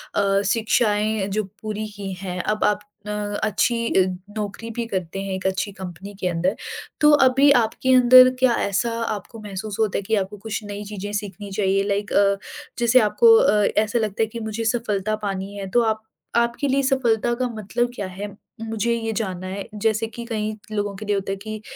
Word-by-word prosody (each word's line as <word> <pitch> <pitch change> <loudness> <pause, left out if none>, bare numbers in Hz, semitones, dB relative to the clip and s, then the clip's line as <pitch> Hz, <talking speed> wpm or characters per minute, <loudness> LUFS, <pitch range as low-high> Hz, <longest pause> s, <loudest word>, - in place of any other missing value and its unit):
अ, 200 0 +2
शिक्षाएँ 215 -2 +1
जो 210 +2 -1 0.2
पूरी 215 0 -4
की 195 -1 -5
हैं 180 -1 -3
अब 215 0 -1
आप 210 -1 +3 0.3
अ, - - -4 0.3
अच्छी 230 +2 +1 0.4
नौकरी 210 +2 -4
भी 235 +1 -3
करते 190 -2 -3
हैं 195 -1 -3
एक 190 - -7
अच्छी 190 +2 -1
कंपनी 190 +1 -8
के 180 - -1
अंदर 180 +3 0 0.5
तो 300 0 +7
अभी 270 +2 +5
आपके 260 +4 0
अंदर 255 0 +8
क्या 255 -2 +4
ऐसा 200 +4 0
आपको 215 +2 -5
महसूस 205 0 -6
होता 215 -3 +1
है - - -1
कि 220 +3 +1
आपको 200 +1 -2
कुछ 215 +1 -5
नई 205 0 -6
चीज़ें 205 0 -6
सीखनी 200 -1 -5
चाहिए 195 0 +1
लाइक 200 0 -1
अ, 200 0 +4 0.4
जैसे 240 +2 +5
आपको 455 - +6
अ, 210 - +4
ऐसा 220 +3 +2
लगता 215 0 0
है - - 0
कि 230 +2 -7
मुझे 220 +1 -4
सफ़लता 215 -3 0
पानी 195 0 -3
है 195 -1 -5
तो 240 +5 +3
आप 220 -1 0 0.4
आपके 235 +4 +1
लिए 275 +1 +2
सफ़लता 240 -3 +2
का 255 +1 -1
मतलब 235 +4 -1
क्या 200 - -3
है? 195 +3 -6 0.3
मुझे 225 +1 -1
ये 225 -1 -2
जानना 185 -4 -3
है। 195 +1 -4
जैसे 220 +1 0
कि 235 +1 -8
कई 215 -2 -2 0.2
लोगों 205 -1 -2
के 215 +2 -8
लिए 205 0 +1
होता 195 0 -2
है - - -1
कि 215 +1 -7
210 Hz, 195 wpm, -23 LUFS, 200-230 Hz, 0.5 s, अंदर